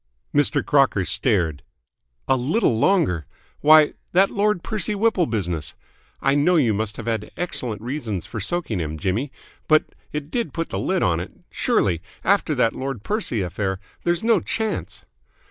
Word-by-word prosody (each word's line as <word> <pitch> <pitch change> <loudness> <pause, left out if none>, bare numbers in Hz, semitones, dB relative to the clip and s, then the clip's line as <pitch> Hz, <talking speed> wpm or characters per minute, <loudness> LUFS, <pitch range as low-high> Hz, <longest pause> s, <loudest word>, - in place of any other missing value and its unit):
Mr. 145 -1 +2
Crocker 135 -9 +3
stared. 85 - 0 0.7
"A 135 - +4
little 130 - +1
longer? 115 - +2 0.3
Why, 155 0 +6 0.2
that 190 +2 +4
Lord 205 -3 +1
Percy 215 -1 -1
Whipple 200 -4 +2
business 90 -8 -2 0.5
I 135 - +3
know 145 +5 +3
you 125 -9 +3
must 105 0 -2
have 115 - -6
had 110 -2 -2
excellent 120 - -2
reasons 120 - -3
for 110 - -6
soaking 120 - -2
him, 80 -1 -3
Jimmy, 105 - -1 0.4
but 155 0 +3 0.2
it 150 0 -5
did 235 -3 -2
put 165 -1 -2
the - - -3
lid 185 -1 0
on 85 -2 +2
it 90 - -6 0.2
surely, 85 -5 +1 0.2
after 190 -5 +2
that 120 -3 +2
Lord 135 -5 -4
Percy 200 - -1
affair 95 +1 -2 0.2
there's 175 +1 0
no 225 -3 +4
chance 220 0 -3
135 Hz, 160 wpm, -23 LUFS, -, 0.7 s, Why